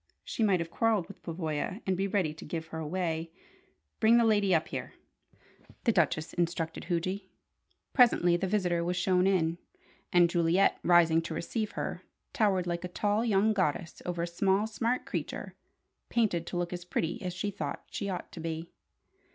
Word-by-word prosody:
She - - -4
might 200 -4 +4
have 170 0 -4
quarrelled 220 -5 +1
with - - -12
Pavoya, 165 +2 -3
and 190 - +1
be 195 +2 0
ready 190 -6 0
to 155 - -11
"give 160 +1 -4
her 160 - -5
away." 165 0 -2 0.7
"Bring 225 +2 +6
the 235 - +4
lady 205 -3 +3
up 160 - 0
here," - - -5 0.9
the 235 - +4
Duchess 160 -4 +1
instructed 170 -2 -2
Huji. 185 +2 -2 0.6
Presently 180 -9 +5
the 190 +2 -1
visitor 180 -4 +1
was 180 +1 -1
shown 185 0 +3
in; 170 -3 +1 0.5
and 175 -1 +6
Juliet, 170 +2 +3
rising 170 -2 +5
to 165 -1 -5
receive 215 +6 -3
her, - - -4 0.3
towered 195 -5 +2
like 175 0 -2
a - - -2
tall 205 +4 0
young 215 -1 +3
goddess 170 -4 -1
over 175 -1 -2
a - - -1
small, 190 +4 +2
smart 230 +3 -1
creature, - - -4 0.6
painted 185 -8 +1
to 175 - -3
look 175 0 -2
as 175 0 -5
pretty 175 -1 -2
as 180 - -3
she 205 +3 -2
thought 150 -7 -5
she 200 - -3
ought 185 - -5
to - - -9
be. 165 0 -4
180 Hz, 175 wpm, -30 LUFS, 170-200 Hz, 0.9 s, Bring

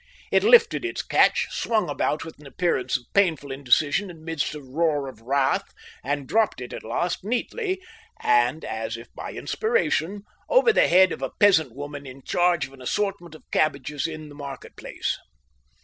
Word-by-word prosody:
It - - +4
lifted 475 -5 +5
its 355 - -3
catch, 485 0 +3
swung 220 -2 0
about 145 +1 -1
with 160 -2 -11
an 150 - -12
appearance 135 -4 0
of - - -15
painful 165 -8 +2
indecision 145 +8 +2
amidst 160 -3 -4
a - - -6
roar 145 +1 -1
of 115 -4 -10
wrath, 135 +3 +1 0.4
and 140 +1 -2
dropped 220 -8 +1
it 125 -1 -7
at - - -6
last 170 +13 -2
neatly, 370 - -2 0.4
and 430 - +2
as 110 +1 -4
if 115 - -13
by - - -7
inspiration, 300 - 0 0.3
over - - +5
the - - +4
head 185 +1 +6
of - - -5
a 135 - -2
peasant 160 - +4
woman 145 0 -7
in 130 +1 -11
charge 175 -2 +2
of 135 - -14
an 135 - -14
assortment 185 +2 -2
of - - -15
cabbages 145 -1 0
in 155 -1 -7
the - - -12
market 140 -2 -9
place. - - -4
155 Hz, 175 wpm, -25 LUFS, 135-200 Hz, 0.4 s, head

